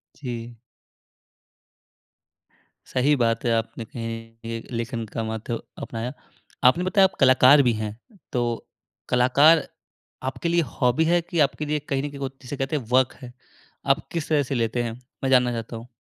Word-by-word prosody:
जी। 120 -3 -6 2.3
सही 140 +3 +2
बात 115 -1 0
है, 120 - +2
आपने 115 0 -2
कहीं 115 0 -6
ये 115 0 -4
लेखन 115 -1 -3
का 115 +1 -4
माध्य 110 +1 -4 0.2
अपनाया। 120 +3 -4 0.5
आपने 150 +8 +5
बताया 190 +1 +4
आप 190 - -1
कलाकार 130 +1 +7
भी 120 -2 +3
हैं, 110 0 -4 0.4
तो 120 -2 -1 0.4
कलाकार 140 +6 +5 0.6
आपके 135 +6 -2
लिए 170 0 +3 0.2
हॉबी 125 +6 +3
है 175 +1 +3
कि 170 -1 -4
आपके 150 +1 +2
लिए 150 0 0
कहीं 135 0 0
न 145 - -3
कहीं 140 -1 -10
वो 135 -1 -2
जिसे 135 +2 -6
कहते 135 +3 -1
हैं 140 - -2
वर्क 130 0 +4
है? 125 -1 -10 0.5
आप 135 +2 +1
किस 165 -3 -3
तरह 150 -2 +3
से 135 +1 -3
लेते 120 +1 0
हैं, 115 -1 -3 0.3
मैं 135 - +1
जानना 125 -2 +4
चाहता 115 0 -5
हूँ। 115 +2 -11
125 Hz, 170 wpm, -24 LUFS, 115-145 Hz, 2.3 s, कलाकार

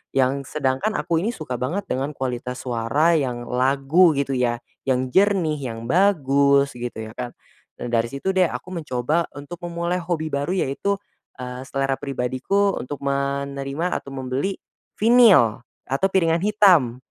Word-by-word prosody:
Yang 135 +2 0
sedangkan 135 +9 0
aku 170 -2 0
ini 210 - 0
suka 155 -6 -6
banget 175 +11 -2
dengan 135 +2 -1
kualitas 125 -1 -4
suara 125 +7 +2
yang 125 -4 -2
lagu 135 +7 +3
gitu 140 -1 0
ya, 120 -2 +1 0.3
yang 130 -1 +1
jernih, 190 -6 +3
yang 115 -3 -5
bagus 140 -6 +3
gitu 120 -2 -6
ya - - -15
kan. 125 -1 -3 0.5
Nah, - - -3
dari 115 -1 +1
situ 140 +8 -2
deh 185 -2 +4
aku - - -7
mencoba 155 0 -1
untuk 155 +5 -9
memulai 170 +1 -2
hobi 165 -2 -2
baru 145 +5 -1
yaitu, 185 +7 -1 0.4
eee, 125 0 -6
selera 135 -1 0
pribadiku 140 +9 0
untuk 145 +3 -6
menerima 140 +3 -2
atau - - -10
membeli 135 +9 -2 0.4
vinyl 215 - +6 0.3
atau 135 +8 +2
piringan 165 -3 +2
hitam, 185 - +4
140 Hz, 145 wpm, -23 LUFS, 130-170 Hz, 0.5 s, vinyl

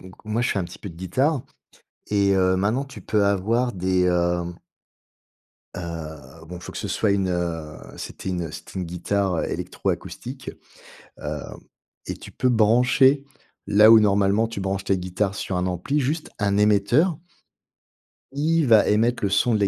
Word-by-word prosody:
donc 95 0 -13
moi, 110 +2 -1
je - - +1
fais - - 0
un 95 - -1
petit - - -10
peu 100 - -7
de 85 - -14
guitare. 130 - 0 0.7
Et, 100 -1 +2
heu, 95 0 +3
maintenant 105 +8 +1
tu 140 - -11
peux 105 -2 +1
avoir 110 +6 +1
des, 95 0 +1
hem 85 -1 0 1.2
heu, 80 -3 -8
bon, 90 +2 -8
faut 90 - -9
que - - -8
ce - - -4
soit 105 -3 +1
une, 95 -2 +1
heu, 85 -3 -3 0.2
c'était - - -6
une, 90 -2 -2
heu, 80 - -6
c'était - - -8
guitare, 90 +2 -1
heu, - - 0
électroacoustique. 130 +2 -4 0.7
Hem, - - -6 0.5
et - - -3
tu - - -11
peux 130 - 0
brancher 125 +5 +4 0.4
là 105 +2 +6
où 115 -1 +9
normalement 100 +2 +2
tu 115 -3 -6
branches 95 0 -2
tes 95 -1 +1
guitares 95 +2 -2
sur 95 -2 -3
un 90 0 0
ampli, 90 - -1
juste 150 +4 -2
un 100 -1 +1
émetteur. 105 - +3 1.1
Il 155 +3 +1
va 110 -4 +5
émettre 115 +2 +2
le 100 - +2
son 115 +5 +2
de 110 - +2
la 100 - +3
100 Hz, 175 wpm, -23 LUFS, 90-115 Hz, 1.2 s, où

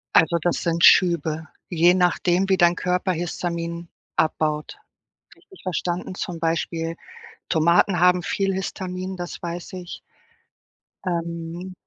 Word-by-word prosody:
Also, 165 +1 +5
das 175 +1 0
sind 170 0 +3
Schübe, 160 -3 +4 0.2
je 175 +1 +4
nachdem, 180 +1 +2
wie 190 -1 +3
dein 175 0 +4
Körper 180 +1 0
Histamin 170 0 -4 0.3
abbaut, 155 -1 0 0.6
richtig 380 - -19
verstanden? 180 0 -3
Zum 175 -5 -5
Beispiel 165 0 -1 0.5
Tomaten 170 +3 +3
haben 180 0 +4
viel 195 +2 -1
Histamin, 185 0 -4
das 175 -1 -6
weiß 170 +1 -6
ich. 180 -1 -7 1.1
Ähm, 170 +1 -4
175 Hz, 115 wpm, -23 LUFS, 165-180 Hz, 1.1 s, Also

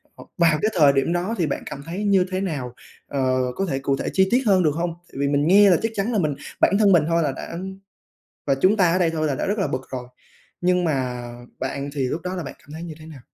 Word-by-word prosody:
ờ, - - -12
vào 165 -3 +4
cái 215 +1 +1
thời 145 -5 +6
điểm 135 +5 +1
đó 180 +6 -1
thì 170 - +1
bạn 140 - -3
cảm 140 - -7
thấy 185 +6 -4
như 195 -2 +4
thế 185 - -1
nào, 140 -10 -3 0.3
ờ, 130 -2 0 0.2
có 195 - -1
thể 135 -2 -1
cụ 135 0 0
thể - - -3
chi 190 0 +4
tiết 255 +2 +3
hơn 190 -4 +4
được 155 - +3
hông? 170 0 -2 0.2
Tại - - -18
vì 140 - +1
mình 145 +1 +1
nghe 200 +3 +7
là 175 - +5
chắc 225 - -1
chắn 205 +4 -1
là 215 - +2
mình 150 -5 0 0.3
bản 195 - +4
thân 205 -2 +5
mình 170 -5 +5
thôi 170 0 +2
là 145 - 0
đã 165 +5 -7 0.9
và 140 - +3
chúng 185 +10 +3
ta 180 -5 +3
ở 185 - +2
đây 175 -3 +2
thôi 155 -1 -1
là 145 - 0
đã - - -2
rất 205 +2 -1
là 195 - +1
bực 130 - -3
rồi, 125 -1 -5 0.5
nhưng 180 0 +2
mà 130 -5 -1 0.4
bạn 140 +1 -4
thì 135 -3 -1
lúc 160 - -3
đó 180 +2 -4
là 175 - -3
bạn 140 - -7
cảm 145 - -16
thấy 160 +2 -7
như 170 -2 -7
thế 155 - -11
nào? 150 -4 -11
165 Hz, 285 wpm, -23 LUFS, 140-185 Hz, 0.9 s, nghe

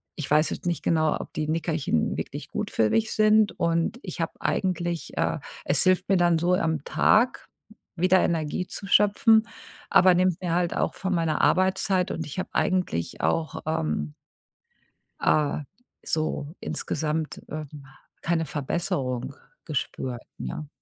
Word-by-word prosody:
ich 155 - -5
weiß 155 +1 +4
jetzt - - -5
nicht 170 - -1
genau, 155 -2 +2
ob - - -8
die 155 - -2
Nickerchen 155 - 0
wirklich - - -5
gut - - -3
für 110 -1 +2
mich 225 -1 +1
sind 215 -1 +3
und 170 +6 +1
ich - - -5
habe - - -2
eigentlich, 175 -3 -2
äh - - 0 0.3
es 140 - +3
hilft 185 0 +2
mir 195 - +4
dann 175 -2 +3
so 175 +2 +2
am 160 -5 -1
Tag 235 +9 +2 0.5
wieder 185 +2 +4
Energie 165 +2 -1
zu 195 - -6
schöpfen, 215 +3 +4 0.4
aber 185 -1 +6
nimmt 185 -1 +2
mir 175 -2 -1
halt 175 -1 0
auch - - 0
von 190 -1 -2
meiner 165 -2 0
Arbeitszeit 185 0 +2
und 165 -2 -4
ich 150 - -8
habe 185 - -3
eigentlich 180 - -1
auch, 160 -1 -1
ähm 75 - -1 1.1
äh, 150 -1 +2 0.5
so 155 -1 -2
insgesamt, 155 0 -3
ähm, 150 -2 -7 0.4
keine 165 -1 0
Verbesserung 135 -4 -2 0.3
gespürt, 130 -4 -3 0.2
ne? 155 -3 -5
165 Hz, 145 wpm, -26 LUFS, 150-185 Hz, 1.1 s, aber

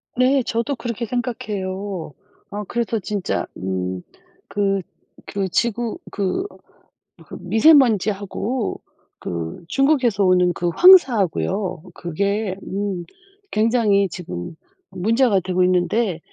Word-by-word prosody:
네. 260 +2 +3
저도 235 +5 -1
그렇게 235 -1 -4
생각해요. 200 - -4 0.4
어, 210 +1 -5
그래서 235 -2 -1
진짜 200 -1 -2
음 95 -1 -3 0.5
그 195 -1 0 0.4
그 195 -2 -3
지구 235 +3 -1
그 200 - -1 0.8
그 - - -8
미세먼지하고 220 - +2 0.4
그 85 - -5
중국에서 255 - +2
오는 180 -1 +4
그 175 +1 -1
황사 355 - +7
하고요. 185 -1 -1
그게 200 +4 -2
음 195 -2 -3 0.5
굉장히 215 -3 +3
지금 160 - -7 0.3
문제가 225 +2 +2
되고 185 0 0
있는데 180 +1 +1
200 Hz, 215 characters per minute, -21 LUFS, 185-235 Hz, 0.8 s, 황사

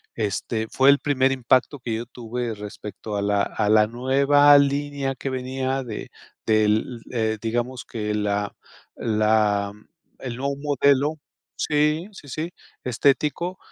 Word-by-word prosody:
este, 110 +1 -2
fue 135 +1 +4
el 140 - +3
primer 135 -3 +2
impacto 130 +2 +1
que 115 -3 -3
yo 115 +2 -4
tuve 120 -1 -4
respecto 105 0 -7
a - - -1
la 100 0 +2
a 105 - -1
la 105 0 +5
nueva 140 +4 +5
línea 140 -1 -1
que 135 - -4
venía 130 +1 -2
de 110 -3 -7 0.3
del, 110 +2 +2
eh, 110 -2 0
digamos 120 +3 -2
que 105 -2 -3
la 105 -1 -1 0.4
la 105 -2 +2 0.5
el 125 -3 -5
nuevo 140 +1 -2
modelo 140 0 +2 0.4
sí, 150 +3 +1
sí, 150 -7 -13
sí, 160 +6 -4 0.3
estético 145 +8 +1
125 Hz, 135 wpm, -24 LUFS, 110-140 Hz, 0.5 s, la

